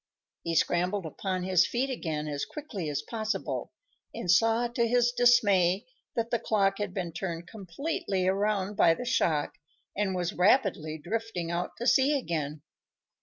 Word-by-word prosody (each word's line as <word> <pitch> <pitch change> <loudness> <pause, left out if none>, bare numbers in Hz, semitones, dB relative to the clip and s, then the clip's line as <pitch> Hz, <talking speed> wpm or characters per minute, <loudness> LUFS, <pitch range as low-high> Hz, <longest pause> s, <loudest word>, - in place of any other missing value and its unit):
He 165 0 -2
scrambled 180 +4 +1
upon 185 +3 -3
his 185 -1 +3
feet 260 +3 -1
again 155 -10 -3
as 145 -1 -3
quickly 220 - -5
as 145 0 -2
possible, 220 +4 -3 0.4
and 175 - 0
saw, 225 +5 +3
to 235 0 0
his 245 0 +3
dismay, 205 -7 +4 0.3
that 230 0 -1
the 235 - +1
clock 195 -3 +1
had 205 -2 -2
been 180 -3 -4
turned 170 0 -4
completely 200 - -3
around 200 0 0
by 165 -4 +5
the 245 - -6
shock 160 - 0 0.4
and 195 -2 0
was 175 -1 -1
rapidly 180 - +2
drifting 180 0 -3
out 175 +1 -3
to 235 - -4
sea 275 +3 +4
again. 155 - -3
195 Hz, 155 wpm, -28 LUFS, 170-230 Hz, 0.4 s, by